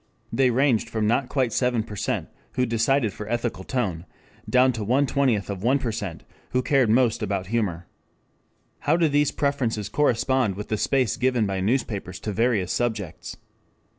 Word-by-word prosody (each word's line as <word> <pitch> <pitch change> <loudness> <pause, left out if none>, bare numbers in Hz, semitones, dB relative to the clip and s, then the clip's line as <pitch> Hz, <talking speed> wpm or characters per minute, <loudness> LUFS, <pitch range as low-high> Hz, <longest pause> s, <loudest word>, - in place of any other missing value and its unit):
They 130 -1 +3
ranged 120 -2 +2
from 110 -2 -1
not 120 +4 +1
quite 130 -5 0
seven 125 -3 +1 0.7
who 125 - +1
decided 115 -1 +1
for 105 0 -7
ethical 120 -5 -2
tone, 95 -9 -2 0.4
down 130 0 +4
to 110 -2 -4
one 130 +7 +2
twentieth 130 -8 +1
of 100 -2 -5
one 125 +6 +3
percent 110 - -4 0.3
who 125 0 +2
cared 135 -5 +3
most 115 0 +3
about 100 -3 -2
humor. 90 -7 -1 0.9
How 160 +3 +2
do 170 -2 +3
these 145 -1 +2
preferences 125 -9 -1
correspond 130 -5 +1
with 105 +2 -7
the 110 - 0
space 130 0 +1
given 125 -3 +2
by 95 -1 -2
newspapers 100 -4 -1
to 105 - -3
various 110 -4 +1
subjects? 110 -8 -3
115 Hz, 160 wpm, -24 LUFS, 105-130 Hz, 0.9 s, down